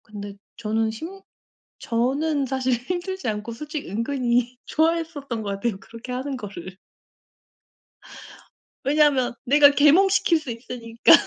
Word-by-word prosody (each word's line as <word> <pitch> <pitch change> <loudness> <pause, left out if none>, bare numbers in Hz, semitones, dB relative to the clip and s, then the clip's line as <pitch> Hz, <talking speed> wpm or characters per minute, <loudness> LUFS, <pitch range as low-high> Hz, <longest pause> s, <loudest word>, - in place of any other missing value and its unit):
근데 205 -1 -8 0.2
저는 220 0 0
힘 335 - -8 0.6
저는 275 +5 0
사실 260 -1 0
힘들지 355 +9 -3
않고 215 +2 -4
솔직히 300 - -6
은근히 240 +2 0
좋아했었던 315 -7 -1
것 205 - -4
같아요, 200 +1 -2
그렇게 230 +4 -10
하는 265 +2 -3
거를. 190 -4 -8 2.1
왜냐면 280 -3 +3
내가 285 +2 +7
계몽시킬 330 +4 +4
수 305 - -9
있으니까. 230 0 +2
255 Hz, 265 characters per minute, -24 LUFS, 230-300 Hz, 2.1 s, 내가